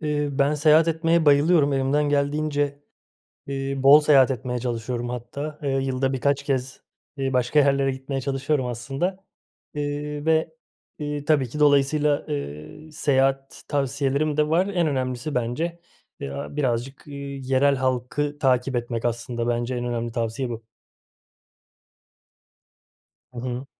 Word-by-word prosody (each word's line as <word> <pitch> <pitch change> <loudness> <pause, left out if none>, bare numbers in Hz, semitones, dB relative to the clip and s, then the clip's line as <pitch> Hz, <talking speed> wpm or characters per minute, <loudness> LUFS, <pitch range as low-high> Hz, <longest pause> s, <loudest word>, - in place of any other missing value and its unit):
Eee, 150 -1 -1
ben 140 +2 +2
seyahat 155 +2 +5
etmeye 165 0 +2
bayılıyorum. 145 0 +4
Elimden 140 +2 +1
geldiğince, 145 0 0 0.6
eee, 135 0 -3
bol 140 +2 +8
seyahat 140 -3 +5
etmeye 125 0 -3
çalışıyorum 120 0 -3
hatta. 140 +5 -6
Eee, 140 - -1
yılda 135 0 0
birkaç 140 +1 0
kez, 130 -2 -2 0.4
eee, 135 -1 -2
başka 125 +3 +2
yerlere 140 -1 +3
gitmeye 135 +1 -4
çalışıyorum 135 0 -1
aslında. 140 +11 -3 0.5
Eee, 145 0 -3
ve, 160 - +1 0.4
iii, 145 -1 -4
tabii 145 -4 +2
ki 150 +6 -6
dolayısıyla, 145 +1 +3
eee, 75 - -6
seyahat 135 -2 0
tavsiyelerim 140 +2 0
de 150 0 +2
var. 170 +4 +2
En 180 -4 0
önemlisi 130 0 -2
bence, 155 +9 -2 0.4
eee, - - -4
a 70 - -6
birazcık, 130 -1 -2
eee, 145 -1 -9 0.3
yerel 135 +2 +2
halkı 130 +3 -1
takip 130 -1 +1
etmek 120 -1 -3
aslında. 120 0 -2
Bence 120 +1 -1
en 120 0 -3
önemli 120 -1 -3
tavsiye 115 +2 -2
bu. 115 -1 -6 2.7
Hı 125 - -9
hı. 125 +2 -4
135 Hz, 135 wpm, -24 LUFS, 125-150 Hz, 2.7 s, bol